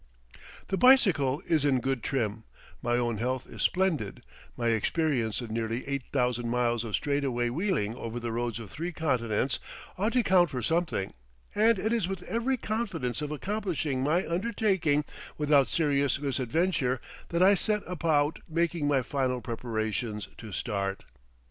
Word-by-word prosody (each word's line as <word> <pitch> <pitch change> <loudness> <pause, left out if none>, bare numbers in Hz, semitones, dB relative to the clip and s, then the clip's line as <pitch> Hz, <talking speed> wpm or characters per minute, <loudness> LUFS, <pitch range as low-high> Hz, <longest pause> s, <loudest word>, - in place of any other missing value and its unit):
The 195 - 0
bicycle 180 - +5
is 155 -4 +2
in 135 -3 +3
good 135 -1 -1
trim, 110 -5 -1 0.4
my 120 0 +1
own 120 -2 0
health 125 +3 -1
is - - -8
splendid, 175 - 0 0.3
my 120 -1 +1
experience 120 0 +1
of 115 -2 -6
nearly 115 +2 -2
eight 140 -3 -2
thousand 125 -3 0
miles 120 -1 +1
of 110 -3 -1
straightaway 135 -4 0
wheeling 145 - 0
over 115 0 -5
the 120 -1 -3
roads 120 -1 -2
of 115 -4 -9
three 170 +3 -4
continents 130 -6 0 0.4
ought 215 +4 +1
to 250 -1 +3
count 180 -4 +4
for 125 -4 -4
something, 155 - 0 0.4
and 225 +1 +4
it 220 +4 0
is 225 -7 +1
with 190 -2 -4
every 240 +3 0
confidence 210 - -2
of 150 - -3
accomplishing 160 -6 -2
my 155 +7 +1
undertaking 180 -6 +1 0.3
without 145 -3 +4
serious 140 -4 +2
misadventure 135 0 0 0.3
that 170 +1 +2
I 195 +2 +7
set 210 +2 0
about 155 -3 +1
making 165 -2 0
my 135 -3 +2
final 130 -1 -1
preparations 110 -3 -3
to 110 - -8
start. 100 0 -2
140 Hz, 155 wpm, -29 LUFS, 120-175 Hz, 0.4 s, I